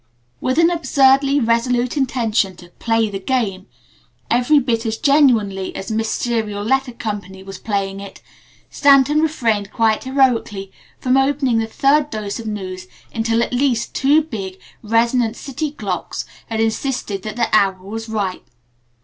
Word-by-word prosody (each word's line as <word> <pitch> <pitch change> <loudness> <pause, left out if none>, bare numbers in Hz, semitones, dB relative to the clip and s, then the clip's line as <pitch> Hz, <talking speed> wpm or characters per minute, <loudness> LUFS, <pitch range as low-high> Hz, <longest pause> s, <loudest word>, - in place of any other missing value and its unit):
With 255 +2 -1
an 335 +1 +5
absurdly 275 -4 +3
resolute 240 +1 +1
intention 230 -8 0
to 175 0 -15
"play 225 -1 +1
the 195 - -4
game" 195 -4 -2 0.6
every 245 +5 +4
bit 235 -4 +1
as 225 -1 -2
genuinely 225 -10 +2
as 195 - -5
Miss 220 0 -1
Serial 220 -4 -2
Letter 265 +3 +1
Co. 210 -3 -4 0.2
was 195 -1 -8
playing 195 -2 -2
it, 200 0 -10 0.5
Stanton 285 +1 +4
refrained 225 -10 0
quite 225 -1 +1
heroically 245 -7 +1 0.3
from 255 +1 +2
opening 270 -3 +2
the 225 - -1
third 285 +5 +2
dose 215 -3 -4
of 225 - -7
news 185 -3 -5 0.3
until 225 0 +1
at - - -4
least 250 -2 0
two 290 +3 +3
big, 195 -10 -6 0.2
resonant 230 +1 +1
city 290 +4 -4
clocks 200 - -4 0.2
had 225 -1 -3
insisted 225 -2 -1
that 215 +2 -6
the 235 -1 +1
hour 195 -3 +3
was 225 +3 -6
ripe. 200 -4 -3
230 Hz, 150 wpm, -19 LUFS, 205-265 Hz, 0.6 s, an